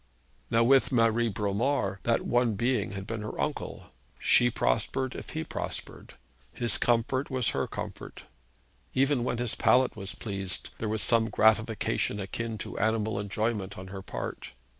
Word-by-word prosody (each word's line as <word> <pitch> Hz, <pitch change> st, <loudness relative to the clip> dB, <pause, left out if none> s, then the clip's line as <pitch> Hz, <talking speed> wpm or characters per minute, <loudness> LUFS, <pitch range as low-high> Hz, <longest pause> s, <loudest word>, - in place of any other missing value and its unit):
Now 115 Hz, +1 st, +4 dB
with 135 Hz, +3 st, +4 dB
Marie 115 Hz, -1 st, +3 dB
Bromar 105 Hz, +1 st, 0 dB
that 115 Hz, -1 st, +2 dB
one 120 Hz, -3 st, +2 dB
being 120 Hz, -2 st, 0 dB
had 95 Hz, -1 st, -5 dB
been 115 Hz, +1 st, -4 dB
her 105 Hz, -, -6 dB
uncle. -, -, -3 dB, 0.3 s
She 120 Hz, -, +4 dB
prospered, 130 Hz, +3 st, 0 dB
if -, -, -8 dB
he 160 Hz, 0 st, -3 dB
prospered. -, -, -6 dB, 0.4 s
His 120 Hz, -3 st, +2 dB
comfort 120 Hz, +3 st, +1 dB
was 130 Hz, -3 st, +1 dB
her -, -, -1 dB
comfort. -, -, -7 dB, 0.7 s
Even 135 Hz, -1 st, +3 dB
when 120 Hz, -1 st, -1 dB
his 120 Hz, -1 st, 0 dB
palate 130 Hz, 0 st, +3 dB
was 100 Hz, -2 st, -5 dB
pleased, 100 Hz, -3 st, -5 dB
there 110 Hz, -, -2 dB
was 110 Hz, -1 st, 0 dB
some 115 Hz, -1 st, +3 dB
gratification 110 Hz, -1 st, +2 dB
akin 110 Hz, +3 st, -4 dB
to -, -, -6 dB
animal 110 Hz, 0 st, +1 dB
enjoyment 100 Hz, -1 st, -2 dB
on 95 Hz, 0 st, -8 dB
her 95 Hz, 0 st, -6 dB
part. -, -, -6 dB
115 Hz, 155 wpm, -29 LUFS, 100-120 Hz, 0.7 s, Now